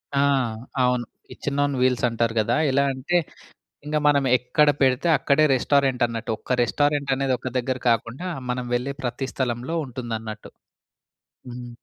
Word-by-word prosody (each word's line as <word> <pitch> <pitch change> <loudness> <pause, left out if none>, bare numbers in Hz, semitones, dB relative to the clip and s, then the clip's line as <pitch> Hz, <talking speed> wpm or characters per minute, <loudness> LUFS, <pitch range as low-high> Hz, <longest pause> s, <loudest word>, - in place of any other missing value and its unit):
ఆ! - - +3 0.6
అవును. 125 -1 +1 0.2
Kitchen 145 0 -4
on 145 0 0
wheels 125 -1 +2
అంటారు 115 0 0
గదా! 110 +2 +1 0.2
ఎలా 140 +1 +3
అంటే 135 +7 0 0.7
ఇంగ 150 +1 -2
మనం 140 -2 +3
ఎక్కడ 150 +4 +2
పెడితే 130 +5 +2
అక్కడే 155 +2 +3
రెస్టారెంటన్నట్టు. 125 -4 +1
ఒక 125 - -2
రెస్టారెంటనేది 140 0 +1
ఒక 130 - -5
దగ్గర 130 +1 -2
కాకుండా 120 +9 -1 0.2
మనం 125 0 -2
వెళ్ళే 135 +3 -2
ప్రతి 130 +2 -3
స్థలంలో 125 +4 -2
ఉంటుందన్నట్టు. 115 -4 -6 1.0
హ్మ్. 120 0 -8
130 Hz, 130 wpm, -24 LUFS, 120-140 Hz, 1.0 s, ఆ